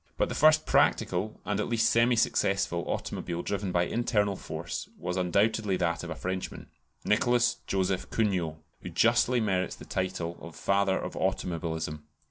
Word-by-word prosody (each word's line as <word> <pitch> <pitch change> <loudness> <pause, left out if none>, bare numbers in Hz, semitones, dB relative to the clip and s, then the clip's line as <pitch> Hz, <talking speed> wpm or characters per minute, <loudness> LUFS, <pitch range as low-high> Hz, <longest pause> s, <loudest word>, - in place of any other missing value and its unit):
But - - +1
the - - -3
first 155 +1 +5
practical, 95 +5 +1
and 105 -1 -1
at 105 - -1
least 115 -1 +2
semi 120 +1 +4
successful, 95 -5 +1
automobile 85 0 -3
driven 100 -2 -2
by 90 -1 +2
internal 105 -1 0
force - - -6
was 90 - -3
undoubtedly 100 +2 +1
that 85 -1 -1
of - - -6
a - - -4
Frenchman, 95 0 -5 0.3
Nicholas 120 +2 +3
Joseph 95 -1 0
Cugnot, 95 -8 0 0.3
who 90 - -6
justly 115 +7 +3
merits 95 -4 0
the - - -12
title 90 -2 -3
of 85 -1 -10
father 100 -1 +1
of - - -5
automobilism. 80 -4 -2
95 Hz, 155 wpm, -29 LUFS, 90-110 Hz, 0.3 s, first